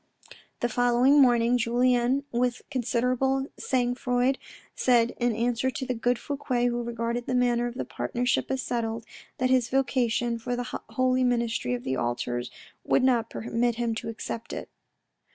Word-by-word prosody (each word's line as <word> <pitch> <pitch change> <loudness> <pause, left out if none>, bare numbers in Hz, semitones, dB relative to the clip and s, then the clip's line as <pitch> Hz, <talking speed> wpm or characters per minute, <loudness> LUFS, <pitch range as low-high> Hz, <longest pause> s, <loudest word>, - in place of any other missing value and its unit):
The 240 - +2
following 245 +4 +4
morning, 245 -1 +4
Julien 245 +3 +2
with 245 0 0
considerable 255 +2 +1
sangfroid, 250 +1 0 0.3
said 240 -2 +3
in 240 -2 +1
answer 240 +2 0
to 260 - -4
the 255 - -1
good 245 +1 0
Fouque, 285 +2 -6 0.2
who 240 0 -2
regarded 235 0 -3
the 255 - 0
matter 240 -1 +2
of 240 - -7
the - - -3
partnership 245 +1 -1
as 265 -1 -1
settled, 225 -1 -2 0.3
that 255 0 +1
his 255 -2 +3
vocation 240 -3 +1
for 245 +1 -3
the 245 0 -4
holy 255 0 +2
ministry 235 - 0
of 120 - -7
the 130 0 -1
altars 120 0 -2 0.3
would - - +2
not 240 -3 +2
permit 235 +1 -1
him 235 -1 -1
to 220 - -5
accept 225 0 -6
it. - - -6
245 Hz, 155 wpm, -27 LUFS, 235-255 Hz, 0.3 s, following